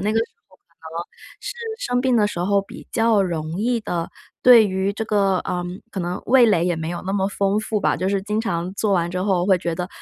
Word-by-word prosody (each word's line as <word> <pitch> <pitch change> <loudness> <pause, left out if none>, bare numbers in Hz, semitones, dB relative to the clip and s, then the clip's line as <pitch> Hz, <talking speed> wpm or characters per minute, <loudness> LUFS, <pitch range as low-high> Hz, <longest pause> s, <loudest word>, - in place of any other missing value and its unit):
那 210 +3 0
个 225 - +2
时 225 - +2 0.2
候， 185 - -23
可 - - -57 0.3
能 170 - -3 0.4
是 - - -5 0.3
生 245 - 0
病 260 -1 +2
的 210 -2 +4
时 205 - -5
候 200 +2 +2
比 - - -12
较 225 -3 +3
容 165 -2 -3
易 235 +1 +1
的， 170 -5 -3 0.3
对 240 -3 +8
于 190 0 -1
这 220 +2 -4
个， 200 -3 +2
呃， 180 0 -3 0.3
可 195 - -4
能 175 +2 -3
味 250 0 +6
蕾 185 -6 +3
也 175 - +1
没 160 0 -4
有 175 - -5
那 190 +1 -3
么 195 -1 +1
丰 200 0 0
富 215 0 -2
吧， - - +1
就 185 - -1
是 195 -1 0
经 210 +2 -1
常 175 -4 -2
做 205 0 0
完 175 -2 +1
之 180 - -3
后 185 -3 +1
会 190 -2 +4
觉 170 -1 -2
得 180 +1 -4
195 Hz, 270 characters per minute, -22 LUFS, 180-215 Hz, 0.4 s, 对